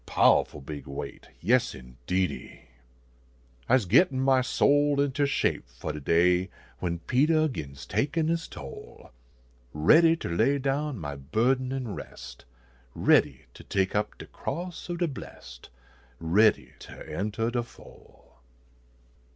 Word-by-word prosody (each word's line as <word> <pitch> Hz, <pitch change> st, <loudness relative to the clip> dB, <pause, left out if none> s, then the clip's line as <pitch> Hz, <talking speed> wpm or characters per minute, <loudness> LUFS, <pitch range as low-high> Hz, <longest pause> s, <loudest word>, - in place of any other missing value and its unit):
Pow -, -, +5 dB
ful 75 Hz, -, -12 dB
big 70 Hz, 0 st, -8 dB
weight! 70 Hz, 0 st, -7 dB
Yes, 120 Hz, +7 st, +2 dB
indeedy! 65 Hz, +9 st, -4 dB, 1.1 s
I 130 Hz, -, +6 dB
se 110 Hz, -8 st, -3 dB
gittin 130 Hz, -, +4 dB
my 130 Hz, -1 st, +3 dB
soul 145 Hz, +2 st, +2 dB
inter 140 Hz, 0 st, +1 dB
shape 100 Hz, -, -1 dB
fo -, -, -6 dB
de 75 Hz, -, -6 dB
day 90 Hz, +5 st, +2 dB, 0.3 s
When 85 Hz, -2 st, -2 dB
Peter 155 Hz, -, +2 dB
gins 70 Hz, -, -7 dB
takin 145 Hz, -, 0 dB
is 165 Hz, 0 st, -1 dB
toll; 70 Hz, -1 st, -11 dB, 0.6 s
Readv 165 Hz, -, +5 dB
ter -, -, -4 dB
lav 140 Hz, +8 st, +2 dB
down 140 Hz, 0 st, -1 dB
my 75 Hz, -5 st, -5 dB
burden 120 Hz, -, 0 dB
an 130 Hz, -5 st, -3 dB
rest, 65 Hz, -8 st, -10 dB, 0.5 s
Ready -, -, +3 dB
ter -, -, -13 dB
take 95 Hz, -1 st, -1 dB
up 105 Hz, 0 st, -1 dB
de -, -, -9 dB
cross 180 Hz, 0 st, -6 dB
ob 175 Hz, -, -3 dB
de 175 Hz, 0 st, +1 dB
blest, 60 Hz, -, -10 dB, 0.5 s
Ready 100 Hz, +7 st, +3 dB
ter -, -, -11 dB
eutah 110 Hz, +3 st, -2 dB
de 120 Hz, 0 st, 0 dB
fol. 120 Hz, -, -17 dB
115 Hz, 135 wpm, -27 LUFS, -, 1.1 s, I